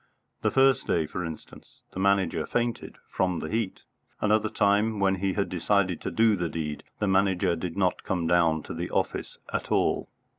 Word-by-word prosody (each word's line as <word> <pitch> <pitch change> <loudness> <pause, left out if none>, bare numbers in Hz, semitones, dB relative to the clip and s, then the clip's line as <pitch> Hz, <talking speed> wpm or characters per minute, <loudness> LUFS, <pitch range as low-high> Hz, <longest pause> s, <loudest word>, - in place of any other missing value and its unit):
The - - +2
first 135 -2 +3
day, 80 -2 +1
for 90 - -5
instance, 80 -2 -10
the - - -5
Manager 95 -5 +1
fainted 120 -1 -2
from 90 -2 0
the 80 - -5
heat. 110 -4 -2 0.4
Another 110 0 +2
time 105 +2 +2
when 95 -1 +3
he 95 0 0
had 100 0 0
decided 90 0 0
to - - -3
do 110 -1 +3
the 85 -3 -2
deed, 75 -3 -4
the - - -1
Manager 95 -3 +2
did 85 +2 -5
not 95 -2 +1
come 90 -3 -1
down 80 -2 +3
to - - -7
the 85 +2 -4
office - - -2 0.2
at - - -3
all. - - +1
95 Hz, 185 wpm, -27 LUFS, 85-105 Hz, 0.4 s, first